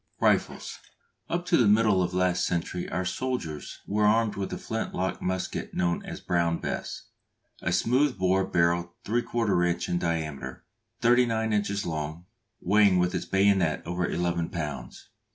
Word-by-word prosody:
RIFLES. - - +1 0.5
Up 175 +1 -1
to 170 - +3
the 120 - +4
middle 105 -2 +4
of 90 -1 0
last 90 -1 +1
century 90 +1 -2
our 90 +2 -2
soldiers 90 - -4
were 105 +1 +2
armed 110 0 +3
with 95 -1 -3
the - - -4
flint 110 0 -4
lock 95 0 -2
musket 95 0 -3
known 85 -1 0
as - - -7
"Brown 85 -1 +1
Bess," - - -4 0.6
a 85 - -1
smooth 125 +8 +2
bore 95 0 +2
barrel 85 -1 +1
3/4 110 -5 +1
inch 85 - -3
in 90 - 0
diameter, 75 -6 -3 0.4
thirty 120 +1 +5
nine 110 -1 0
inches 100 0 0
long, 80 +1 -4 0.3
weighing 100 0 +4
with 90 0 +2
its - - -2
bayonet 95 -4 +2
over 90 +1 -1
eleven 85 -1 -1
pounds. 75 -7 -6
90 Hz, 155 wpm, -27 LUFS, 85-105 Hz, 0.6 s, thirty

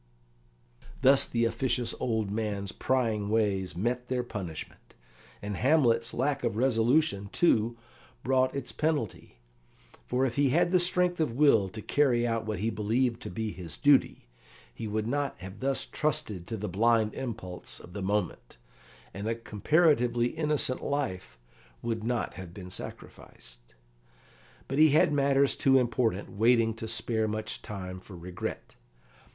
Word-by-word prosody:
Thus 135 +1 +6
the 115 -1 +1
officious 120 +1 0
old 110 -4 -1
man's 105 -2 -2
prying 115 -6 0
ways 100 -4 0
met 120 +5 -1
their 125 -1 -1
punishment. 95 -9 -8 0.5
And 105 -1 -4
Hamlet's 120 -5 +3
lack 135 +1 -1
of 115 -4 0
resolution, 120 -3 +2
too, 115 -8 +2 0.5
brought 130 0 +2
its 135 -2 -4
penalty; 150 - -2 0.7
for 125 +2 +1
if 120 -1 -3
he 140 -1 +3
had 175 +6 +2
had 180 - +5
strength 180 0 +1
of 155 -7 0
will 115 -8 +4
to 110 +2 -9
carry 125 -5 +2
out 115 -1 -1
what 110 - -2
he 110 +5 -1
believed 115 +3 0
to - - -6
be 110 -1 -3
his 85 -3 -7
duty, 145 - +3 0.5
he 110 - -6
would 105 +1 -2
not 140 +4 -2
have 95 +2 -10
thus 135 +1 -1
trusted 110 - -2
to 115 - -4
the 105 +1 -4
blind 110 +2 +2
impulse 110 -8 -6
of 90 - -13
the 100 - -5
moment, 95 -11 -2 0.6
and 100 +2 -5
a 115 - 0
comparatively 120 - +2
innocent 150 -4 0
life 95 - -3 0.5
would 115 -2 -2
not 120 -1 -1
have 90 -2 -10
been 90 -2 -9
sacrificed. - - -10 0.9
But 135 - -2
he 155 0 +7
had 150 +1 +4
matters 140 -1 +3
too 135 -1 +4
important 115 -5 0
waiting 115 +1 +3
to 115 - -5
spare 110 0 0
much 110 0 -3
time 95 -3 -7
for 95 0 -12
regret. 90 +1 -6
115 Hz, 150 wpm, -29 LUFS, 105-130 Hz, 0.9 s, he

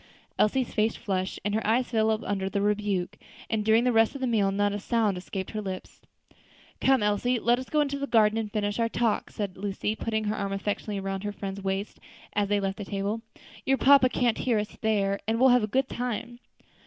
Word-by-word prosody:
Elsie's 245 +4 +2
face 220 +1 +1
flushed, 190 -4 -3
and 205 - 0
her 220 - 0
eyes 240 +3 +1
fell, 220 -1 +1
under 195 -1 -1
the 200 - -1
rebuke; 205 -2 -1 0.3
and 220 -2 +1
during 220 +2 +4
the 250 - +3
rest 225 +3 +3
of 275 - -6
the - - +1
meal 215 -5 +2
not 205 +1 +1
a 205 - -3
sound 215 -1 +1
escaped 190 +1 -5
her 215 - -3
lips. 190 -2 -7 0.8
"Come, 265 -4 +3
Elsie, 210 +5 +1
let 240 +2 +2
us 260 - -8
go 300 - +2
into 280 -1 -1
the 280 - -2
garden 220 -2 +4
and 215 -2 -4
finish 205 +1 -1
our 230 0 +2
talk," 230 -2 0
said 200 -3 -5
Lucy, 205 +2 -2
putting 220 -1 -2
her 210 0 -1
arm 195 0 -2
affectionately 205 +1 -3
around 195 0 -3
her 205 - -2
friend's 200 -1 -6
waist 195 +1 -3 0.3
as 205 -1 0
they 205 0 +2
left 195 -1 -2
the 205 - -4
table; 200 +3 -2 0.4
"your 270 0 +2
papa 270 -1 +6
can't 240 -3 +1
hear 240 -4 +1
us 210 0 -3
there, 200 -3 +1
and 225 +1 +1
we'll 260 +1 +6
have 250 0 +5
a 215 - -1
good 260 +5 +1
time." 240 -1 -4
215 Hz, 220 wpm, -27 LUFS, 200-235 Hz, 0.8 s, papa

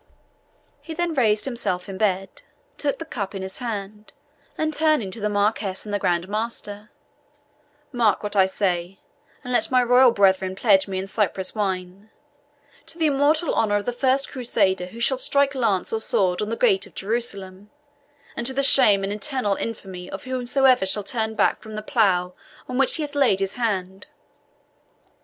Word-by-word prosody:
He 320 - -8
then 345 0 -1
raised 220 -7 +2
himself 225 -8 -2
in 195 -1 -7
bed, 195 -3 -1 0.4
took 285 -2 -1
the 330 - -7
cup 205 -10 -5
in 190 - -5
his 190 0 -6
hand, 210 -2 -6 0.4
and 310 0 -1
turning 305 -10 +1
to 225 - -5
the 210 0 -1
Marquis 205 -1 0
and 205 - -6
the 205 - 0
Grand 175 -1 0
Master 210 -1 -5 1.0
"Mark 235 -6 +1
what 210 0 -4
I 190 -1 +5
say, 185 -1 -2 0.5
and 250 -1 -5
let - - +1
my 255 -1 +3
royal 250 +1 +6
brethren 190 -4 +2
pledge 195 -2 +3
me 190 -1 -4
in 190 - -3
Cyprus 195 -2 -1
wine, 190 0 -4 0.8
'To - - -8
the 325 - +1
immortal 300 +3 +2
honour 205 -2 +1
of 205 0 -1
the 245 - -2
first 265 +2 0
Crusader 200 -8 0
who 225 +5 -11
shall 255 +2 +1
strike 280 +1 +2
lance 225 -9 0
or 220 - -1
sword 185 -3 0
on 210 - -2
the 230 - -2
gate 195 0 +2
of - - -21
Jerusalem; 200 -3 -3 0.7
and 235 - -2
to 265 - +1
the 275 - +1
shame 215 -8 +5
and 195 +1 -2
eternal 255 -2 -1
infamy 190 -5 -6
of 195 - -7
whomsoever 255 -3 +2
shall 205 +2 0
turn 220 0 -2
back - - +1
from 220 -1 -9
the 215 - -5
plough 185 -5 +1 0.3
on 255 0 -3
which 270 - +5
he 315 - -1
hath 295 -1 -6
laid 270 -9 +3
his 195 0 -2
hand!'" 195 -5 -3
210 Hz, 180 wpm, -23 LUFS, 195-255 Hz, 1.0 s, royal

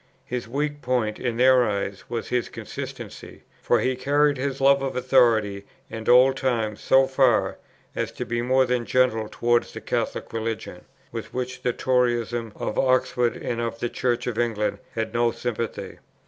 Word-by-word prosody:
His 125 -2 -4
weak 145 +4 -2
point, 125 -4 -1
in 120 -2 -2
their 130 0 +6
eyes, 100 -3 -3
was 115 -1 -4
his 125 -1 -1
consistency; - - -8 0.2
for - - +2
he 130 0 +1
carried 145 +3 +2
his 135 +1 -3
love 140 0 +5
of 135 -1 -3
authority 115 -6 +3 0.3
and 110 -1 -4
old 130 +2 +6
times 115 -5 -1
so 135 0 +5
far, 130 -3 +2 0.4
as - - -2
to - - -5
be 120 0 -2
more 130 +2 +3
than 125 -1 0
gentle 115 -3 +1
towards 120 0 +1
the - - -6
Catholic - - -3
Religion, 115 -1 -4 0.3
with - - -7
which 130 0 -4
the 125 - +1
Toryism 120 -2 0
of 105 - -3
Oxford 125 -2 +2
and 120 -1 -3
of 115 -1 -3
the 120 +1 -2
Church 120 0 -1
of 120 -2 -3
England 115 -3 0 0.2
had 110 -1 -2
no 120 0 +3
sympathy. 115 -1 -4
120 Hz, 170 wpm, -24 LUFS, 115-130 Hz, 0.4 s, their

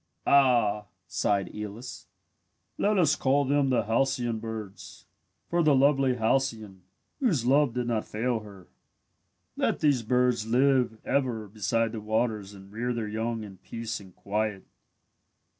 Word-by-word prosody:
"Ah," 120 -7 +4 0.2
sighed 100 -1 -1
Aeolus, 105 +3 -7 0.7
"let 210 0 +2
us 160 -5 +4
call 140 +2 +2
them 140 0 +2
the 125 - +2
halcyon 120 0 0
birds, 100 -4 -8 0.4
for 170 0 +1
the 150 -3 +4
lovely 135 -1 +3
Halcyone, 110 -5 -1 0.4
whose 180 - +1
love 135 -1 +3
did 125 -1 -1
not 115 -2 -1
fail 115 +2 -1
her. 100 -4 -13 0.9
"Let - - 0
these 145 -5 +3
birds 125 -1 +1
live 125 -1 +2
ever 120 -6 0
beside 110 +2 -1
the 110 -2 -6
waters 110 -2 -1
and 95 0 -14
rear 120 +3 -2
their 115 -2 -3
young 110 +1 -3
in 100 -3 -10
peace 115 +3 -5
and 95 -3 -15
quiet. 105 -1 -2
115 Hz, 140 wpm, -27 LUFS, 105-130 Hz, 0.9 s, Ah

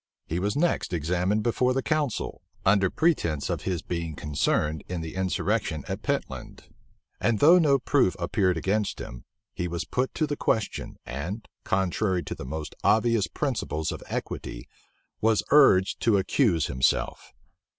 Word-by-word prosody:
He 85 - -2
was 100 +3 -1
next 165 - 0
examined 90 +6 0
before 125 +2 +1
the 135 - 0
council, 150 -6 -1 0.2
under 95 -1 +4
pretence 85 - +1
of - - -3
his 90 -4 -2
being 85 -3 -4
concerned 75 +1 0
in 90 -2 -3
the 80 -1 -6
insurrection 95 -2 -1
at - - -4
Pentland; - - -4 0.6
and 115 -2 +2
though 165 - +7
no 145 -4 +4
proof 130 - +2
appeared 90 0 +1
against 100 +5 0
him, - - -8 0.3
he 90 - -2
was 85 0 -3
put 130 +1 -1
to 155 - +1
the 145 -1 -2
question, 110 -5 -1
and, 85 - -5 0.2
contrary 95 -1 0
to - - -5
the - - -8
most 75 +3 -5
obvious 110 +1 +3
principles 110 - -2
of - - -6
equity, - - -5 0.5
was 110 -1 +3
urged 100 -11 +5
to 110 -3 +3
accuse 95 - +2
himself. 65 +1 0
95 Hz, 150 wpm, -26 LUFS, 85-115 Hz, 0.6 s, though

